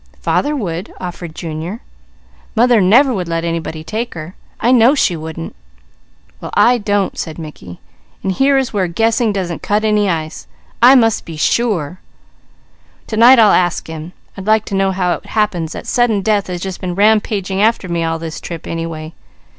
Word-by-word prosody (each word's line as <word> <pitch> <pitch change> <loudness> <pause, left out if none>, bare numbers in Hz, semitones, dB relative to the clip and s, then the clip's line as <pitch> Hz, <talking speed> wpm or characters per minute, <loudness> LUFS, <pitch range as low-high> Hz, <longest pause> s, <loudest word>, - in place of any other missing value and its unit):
"Father 295 +1 0
would," 180 - -4
offered 175 -2 -7
Junior. 165 +6 -5 0.8
"Mother 235 -1 +4
never 245 +9 +5
would 185 -5 -3
let 165 0 -2
anybody 165 -1 -4
take 220 +7 -4
her. 165 +2 -7 0.3
I 240 - +2
know 250 +3 +5
she 180 -10 +1
wouldn't." 160 +1 -7 0.8
"Well - - -7
I 245 0 +4
don't," 205 -2 -1
said 160 -2 -5
Mickey, 150 - -10 0.4
"and 195 - 0
here 270 +8 +3
is 265 -3 -1
where 195 -3 0
guessing 225 +5 +1
doesn't 185 -4 -3
cut 210 +1 0
any 210 -2 +2
ice. 160 -2 -4 0.3
I 250 +3 +8
must 225 -4 +3
be 165 -2 -9
sure. 185 -4 0 1.1
To 220 - -5
night 245 +4 +8
I'll 220 -3 +6
ask 175 -1 +1
him. 160 +2 -8 0.2
I'd 195 0 -8
like 215 0 +3
to 200 - -4
know 195 0 +2
how 180 -2 0
it - - -8
happens 180 -7 -1
that - - -8
sudden 235 -5 +1
death 210 -1 +1
has 180 -1 -5
just 190 -1 -5
been 180 -2 -3
rampaging 200 -2 +1
after 220 -3 +2
me 170 -1 -1
all 165 0 -1
this 160 -1 -7
trip, 170 -2 -7
anyway. 165 -1 -5
190 Hz, 180 wpm, -16 LUFS, 165-220 Hz, 1.1 s, I